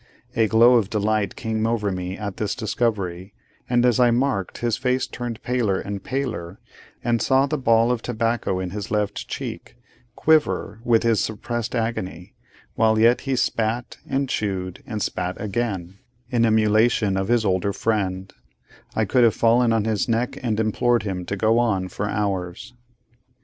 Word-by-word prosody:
A 110 Hz, -1 st, +3 dB
glow 120 Hz, +3 st, +6 dB
of 105 Hz, -4 st, 0 dB
delight 110 Hz, -1 st, 0 dB
came 110 Hz, 0 st, -1 dB
over 110 Hz, -3 st, 0 dB
me 90 Hz, 0 st, -4 dB
at 100 Hz, -3 st, -5 dB
this 105 Hz, -2 st, -2 dB
discovery; 100 Hz, -4 st, -2 dB, 0.3 s
and 120 Hz, 0 st, +3 dB
as 125 Hz, 0 st, +3 dB
I 125 Hz, -1 st, +5 dB
marked 120 Hz, -6 st, 0 dB
his 120 Hz, -2 st, 0 dB
face 130 Hz, 0 st, 0 dB
turn 120 Hz, -2 st, -5 dB
paler 115 Hz, -6 st, 0 dB
and 100 Hz, -1 st, -5 dB
paler, 100 Hz, -10 st, -4 dB, 0.4 s
and 115 Hz, -2 st, +1 dB
saw 135 Hz, +2 st, +3 dB
the 150 Hz, +1 st, -2 dB
ball 115 Hz, -1 st, +3 dB
of 120 Hz, -2 st, -1 dB
tobacco 115 Hz, -5 st, -1 dB
in 90 Hz, -1 st, -4 dB
his 105 Hz, +1 st, -5 dB
left 105 Hz, -1 st, -2 dB
cheek, -, -, -6 dB, 0.4 s
quiver 155 Hz, -8 st, +2 dB
with 120 Hz, -2 st, +3 dB
his 115 Hz, -3 st, +2 dB
suppressed 120 Hz, +2 st, -3 dB
agony, 95 Hz, -7 st, -3 dB, 0.4 s
while 110 Hz, -1 st, +3 dB
yet 115 Hz, +3 st, +4 dB
he 135 Hz, -, +2 dB
spat, 115 Hz, 0 st, -1 dB
and 135 Hz, 0 st, 0 dB
chewed, 95 Hz, -6 st, -3 dB
and 110 Hz, -3 st, -3 dB
spat 90 Hz, 0 st, -3 dB
again, 100 Hz, -4 st, -3 dB, 0.3 s
in 120 Hz, -2 st, +3 dB
emulation 110 Hz, -1 st, +3 dB
of 95 Hz, 0 st, -1 dB
his 120 Hz, -1 st, +2 dB
older 95 Hz, +1 st, +1 dB
friend, 95 Hz, -3 st, -2 dB, 0.6 s
I 110 Hz, -, +2 dB
could 125 Hz, +4 st, +3 dB
have 115 Hz, -3 st, +4 dB
fallen 115 Hz, +1 st, +3 dB
on 110 Hz, -2 st, +1 dB
his 110 Hz, 0 st, 0 dB
neck 115 Hz, +2 st, 0 dB
and 110 Hz, -4 st, -1 dB
implored 120 Hz, +1 st, +1 dB
him 95 Hz, -3 st, -4 dB
to 100 Hz, -, -2 dB
go 110 Hz, +3 st, +3 dB
on 100 Hz, -6 st, 0 dB
for 105 Hz, +2 st, -3 dB
hours. 95 Hz, -1 st, -3 dB
110 Hz, 165 wpm, -23 LUFS, 100-120 Hz, 0.6 s, glow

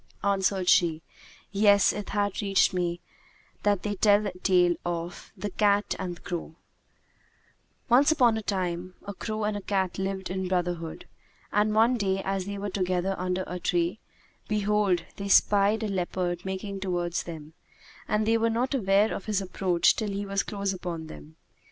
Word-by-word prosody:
Answered 195 Hz, -2 st, +1 dB
she:—Yes, 190 Hz, +4 st, +2 dB
it 210 Hz, 0 st, -6 dB
hath 205 Hz, 0 st, -1 dB
reached 195 Hz, -2 st, +3 dB
me 175 Hz, -1 st, -1 dB, 0.6 s
that 205 Hz, -3 st, +1 dB
they 210 Hz, -, -1 dB
tell 205 Hz, +1 st, +4 dB
a 200 Hz, -, -1 dB
tale 180 Hz, -2 st, +4 dB
of 170 Hz, 0 st, -5 dB
THE 205 Hz, +2 st, -4 dB
CAT[FN#166] 205 Hz, +1 st, +2 dB
AND 180 Hz, -2 st, -4 dB
THE -, -, -18 dB
CROW 165 Hz, -2 st, -5 dB, 1.3 s
Once 270 Hz, +5 st, +5 dB
upon 250 Hz, -7 st, +4 dB
a 220 Hz, -, -2 dB
time, 185 Hz, -3 st, -3 dB
a 200 Hz, -, -5 dB
crow 215 Hz, +1 st, -4 dB
and 210 Hz, 0 st, 0 dB
a 205 Hz, -, -4 dB
cat 190 Hz, -1 st, -1 dB
lived 190 Hz, -1 st, -3 dB
in 190 Hz, 0 st, -2 dB
brotherhood; 175 Hz, -3 st, -2 dB, 0.5 s
and 210 Hz, +1 st, +2 dB
one 230 Hz, +3 st, +4 dB
day 195 Hz, -3 st, 0 dB
as 195 Hz, -1 st, -2 dB
they 200 Hz, 0 st, -4 dB
were 200 Hz, 0 st, -4 dB
together 185 Hz, 0 st, 0 dB
under 180 Hz, +1 st, -1 dB
a 180 Hz, -, -5 dB
tree, 175 Hz, +4 st, 0 dB, 0.5 s
behold, 210 Hz, -4 st, +1 dB
they 200 Hz, -, -4 dB
spied 205 Hz, +2 st, +4 dB
a -, -, 0 dB
leopard 180 Hz, -2 st, -2 dB
making 195 Hz, +1 st, -4 dB
towards 175 Hz, -2 st, -1 dB
them, 160 Hz, -2 st, -9 dB, 0.5 s
and 215 Hz, 0 st, +1 dB
they 225 Hz, +1 st, +3 dB
were 230 Hz, +1 st, +2 dB
not 245 Hz, +4 st, 0 dB
aware 205 Hz, -3 st, +3 dB
of -, -, -6 dB
his 210 Hz, -2 st, 0 dB
approach 185 Hz, -2 st, +2 dB
till 215 Hz, -2 st, -2 dB
he 200 Hz, +1 st, -3 dB
was 200 Hz, 0 st, 0 dB
close 200 Hz, -2 st, -3 dB
upon 175 Hz, -3 st, -5 dB
them. 75 Hz, -, -12 dB
195 Hz, 170 wpm, -27 LUFS, 180-205 Hz, 1.3 s, Once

